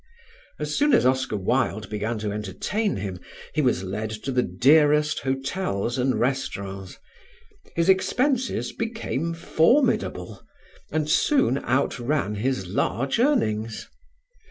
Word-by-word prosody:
As 150 Hz, 0 st, -3 dB
soon 295 Hz, 0 st, +3 dB
as -, -, +3 dB
Oscar 130 Hz, -4 st, +1 dB
Wilde 95 Hz, -, 0 dB
began 110 Hz, +2 st, -2 dB
to 105 Hz, -1 st, -3 dB
entertain 105 Hz, -, -2 dB
him, 95 Hz, -2 st, -5 dB, 0.3 s
he 155 Hz, -, +1 dB
was 125 Hz, -9 st, +1 dB
led 105 Hz, +3 st, -3 dB
to 135 Hz, -, -2 dB
the 125 Hz, -1 st, +2 dB
dearest 150 Hz, -, +3 dB
hotels 135 Hz, -, -2 dB
and 130 Hz, +1 st, +1 dB
restaurants; 100 Hz, -7 st, -3 dB, 0.8 s
his 170 Hz, +1 st, +1 dB
expenses 255 Hz, +7 st, +1 dB
became 220 Hz, -, -3 dB
formidable 170 Hz, -, +1 dB, 0.5 s
and 155 Hz, -1 st, 0 dB
soon 155 Hz, -, +3 dB
outran 125 Hz, -2 st, 0 dB
his 120 Hz, 0 st, -1 dB
large 115 Hz, -, -1 dB
earnings. 115 Hz, -, 0 dB
130 Hz, 115 wpm, -24 LUFS, 105-165 Hz, 0.8 s, soon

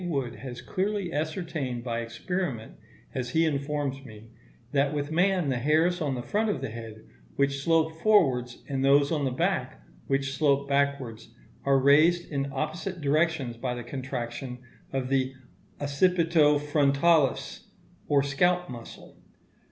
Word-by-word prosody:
Wood 135 Hz, -8 st, -2 dB
has 125 Hz, -3 st, -8 dB
clearly 195 Hz, -2 st, -2 dB
ascertained 155 Hz, -5 st, -3 dB
by 115 Hz, -2 st, -2 dB
experiment, 120 Hz, +2 st, -3 dB, 0.4 s
as 125 Hz, -2 st, -3 dB
he 160 Hz, +5 st, +2 dB
informs 140 Hz, -2 st, -2 dB
me, 110 Hz, -3 st, -13 dB, 0.4 s
that 140 Hz, 0 st, +1 dB
with 145 Hz, +1 st, -2 dB
man 180 Hz, -1 st, +2 dB
the 125 Hz, -2 st, 0 dB
hairs 160 Hz, +6 st, +2 dB
on 140 Hz, -4 st, 0 dB
the 120 Hz, -, -4 dB
front 215 Hz, -, 0 dB
of 205 Hz, -, -1 dB
the 135 Hz, -4 st, -5 dB
head 110 Hz, -1 st, -9 dB, 0.3 s
which 140 Hz, 0 st, +1 dB
slope 160 Hz, 0 st, +2 dB
forwards, 130 Hz, -, +3 dB
and 135 Hz, -1 st, -2 dB
those 140 Hz, +2 st, +4 dB
on 150 Hz, -4 st, 0 dB
the -, -, +1 dB
back 125 Hz, -, -1 dB, 0.3 s
which 135 Hz, 0 st, 0 dB
slope 140 Hz, -1 st, +2 dB
backwards, 135 Hz, -5 st, -1 dB, 0.3 s
are 140 Hz, 0 st, +4 dB
raised 155 Hz, +6 st, +4 dB
in 140 Hz, -1 st, -1 dB
opposite 160 Hz, +6 st, -3 dB
directions 150 Hz, -4 st, +1 dB
by 125 Hz, +1 st, -3 dB
the 120 Hz, -, -6 dB
contraction 125 Hz, -1 st, -5 dB, 0.3 s
of 130 Hz, -1 st, -2 dB
the 135 Hz, -1 st, 0 dB, 0.4 s
occipito 155 Hz, 0 st, +3 dB
frontalis 145 Hz, -1 st, +2 dB, 0.4 s
or 140 Hz, -1 st, +3 dB
scalp 175 Hz, +4 st, +1 dB
muscle. 120 Hz, -2 st, -10 dB
140 Hz, 145 wpm, -27 LUFS, 130-160 Hz, 0.4 s, those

